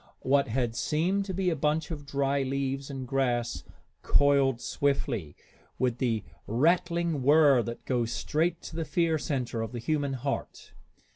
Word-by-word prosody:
What 140 +1 +3
had 120 -1 -1
seemed 180 +10 0
to 190 - -4
be 185 -1 +1
a - - 0
bunch 150 +2 0
of 145 -3 -6
dry 140 0 0
leaves 135 +1 -2
and 135 -2 -5
grass 120 -3 0 0.4
coiled 140 -3 +3
swiftly, 120 - -1 0.4
with 125 -2 0
the 115 -5 0 0.2
rattling 170 - +1
whir 145 -1 +6
that 115 0 -6
goes 120 -3 0
straight 165 +6 -1
to - - -8
the 165 - -1
fear 165 -1 +1
center 125 -6 -2
of 115 +1 -4
the - - -4
human 145 +2 -1
heart. 135 +2 -4
140 Hz, 155 wpm, -28 LUFS, 125-155 Hz, 0.4 s, whir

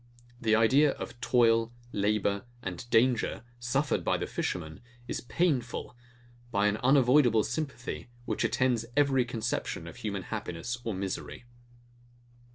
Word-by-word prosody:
The 110 -2 +3
idea 135 +6 +5
of 120 - -8
toil, 115 -3 +3 0.2
labour, 100 0 0 0.2
and 95 +6 -6
danger, 120 0 +2 0.2
suffered 135 +4 0
by - - +1
the - - -2
fishermen, 80 -3 -4 0.3
is - - -3
painful; 125 -4 -1 0.5
by 100 -3 +1
an 105 0 +2
unavoidable 125 -3 +5
sympathy, 135 -1 -4 0.2
which - - -1
attends 125 -3 +1
every 135 -3 +4
conception 115 -2 -3
of - - -10
human - - -3
happiness 115 +8 -4
or 115 -4 -2
misery. 95 +5 -5
120 Hz, 125 wpm, -29 LUFS, 105-130 Hz, 0.5 s, idea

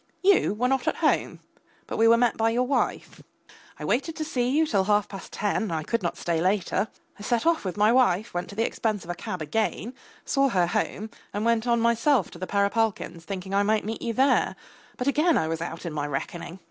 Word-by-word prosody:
You 380 - +4
were 245 +4 +1
not 265 -1 0
at - - +2
home, - - +1 0.4
but - - -5
we 225 - +6
were 230 +1 +6
met 240 -1 +2
by 225 0 +2
your 240 +2 +1
wife. 270 +2 -2 0.6
I - - -6
waited 285 +6 0
to 310 - -3
see 250 -5 0
you 305 +4 +3
till 200 -10 +1
half 205 0 +2
past 195 - -9
ten, 210 +1 -1
I 160 -1 -2
could 230 +8 -1
not 175 - -2
stay 165 -2 -1
later. 195 +2 +1 0.3
I - - -10
set 235 +4 0
off 335 -1 +2
with 185 0 -4
my 210 +2 +4
wife, 230 -4 +2
went 175 0 -3
to 200 - -9
the 225 +2 +1
expense 215 -4 -2
of 175 - -5
a - - -2
cab 175 -1 -5
again, 220 - -2 0.3
saw 275 0 +2
her 185 -6 +2
home, 215 +5 -2 0.2
and 210 +2 -1
went 230 0 +2
on 235 -1 +2
myself 235 - +2
to 170 - -11
the 185 - -4
Perepalkins', 200 -4 0
thinking 190 -1 -5
I 200 - +3
might 215 +1 +1
meet 225 +1 -4
you 235 - -2
there, 265 +4 +2 0.4
but 250 - -3
again 305 +5 +3
I 160 - +1
was 165 0 -3
out 170 +1 -5
in 165 - -4
my 145 -1 -2
reckoning. 165 +5 -5
215 Hz, 230 wpm, -26 LUFS, 185-240 Hz, 0.6 s, we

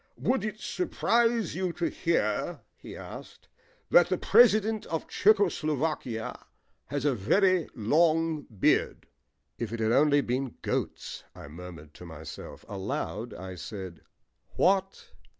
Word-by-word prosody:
"Would 255 -5 0
it 215 0 -4
surprise 235 - +1
you 185 +1 -1
to 170 - -1
hear," 170 -1 -1
he - - -10
asked, - - -10 0.4
"that - - +6
the - - +1
President 220 -2 +4
of 160 - -3
Czecho 205 -1 +4
Slovakia 150 -8 -3 0.4
has 145 +1 -3
a 145 - +3
very 185 - +2
long 160 +6 +2
beard?" 105 -5 +1 0.5
"If 115 -3 -3
it 115 - -4
had 110 0 +1
only 145 +3 +4
been 130 -1 -2
'goats,'" - - -3
I - - -10
murmured 80 -2 -10
to 90 - -11
myself. 80 -1 -9
Aloud 105 +3 -4
I 95 +1 -7
said, 90 -1 -8 0.5
"What?" 195 +1 +1
150 Hz, 130 wpm, -28 LUFS, -, 0.5 s, that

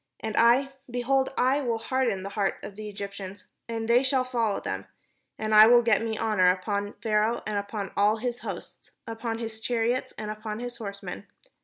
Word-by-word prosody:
And 220 -1 -4
I, 245 +4 +5 0.2
behold, 265 +2 +1
I 265 +3 +3
will 235 -4 0
harden 230 -4 -1
the 195 - -4
hearts 200 -1 -1
of 200 - -9
the 215 0 -6
Egyptians, 200 -1 -7 0.2
and 225 -1 -3
they 235 +2 +5
shall 265 -1 +2
follow 235 -5 0
them; - - -4 0.5
and 215 0 -2
I 215 +1 +10
will 240 0 +7
get 225 -3 +3
me 225 -1 -2
honour 210 -5 +3
upon 200 +2 -1
Pharaoh, 215 +1 +1
and 210 -1 -1
upon 200 -1 -5
all 210 +2 +3
his 245 +1 -3
host, - - -8 0.2
upon 225 0 -4
his 225 -1 -6
chariots, 240 +1 0
and 215 0 -4
upon 215 0 -5
his 245 0 -6
horsemen. 200 -3 -7
225 Hz, 185 wpm, -27 LUFS, 205-240 Hz, 0.5 s, I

